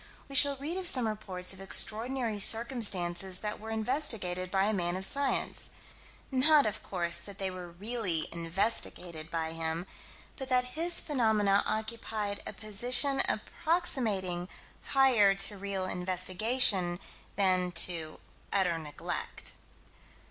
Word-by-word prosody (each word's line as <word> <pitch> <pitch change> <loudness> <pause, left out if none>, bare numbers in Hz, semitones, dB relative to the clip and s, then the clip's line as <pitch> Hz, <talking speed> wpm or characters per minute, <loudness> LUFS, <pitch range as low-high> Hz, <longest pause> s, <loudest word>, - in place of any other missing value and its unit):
We 275 - -12
shall 280 +1 +8
read 305 +7 -5
of 375 -1 0
some 255 -8 +3
reports 190 -4 -3
of 190 - -10
extraordinary 225 +3 +1
circumstances 195 -6 +3
that 210 0 -4
were 220 +1 -9
investigated 220 -6 -2
by 190 0 +1
a 215 - 0
man 175 -3 -2
of 190 +1 -3
science 280 +5 0 0.6
not 290 +3 +4
of 215 0 -3
course 170 -2 -3
that 195 +3 -10
they 190 -1 -3
were 180 -1 -9
really 190 -2 -2
investigated 170 -2 -3
by 160 -1 -3
him, 165 +1 -3 0.5
but 265 -2 -7
that 250 -1 +1
his 340 +2 +1
phenomena 220 -8 +1
occupied 220 -2 -4
a - - -5
position 245 +6 +4
approximating 220 - -2 0.4
higher 245 -8 +3
to 195 +1 +1
real 195 -1 -4
investigation 185 +1 +2 0.4
than 185 -2 +1
to 165 -2 +1 0.3
utter 180 -4 +1
neglect. 150 -2 -5
200 Hz, 125 wpm, -30 LUFS, 180-245 Hz, 0.6 s, shall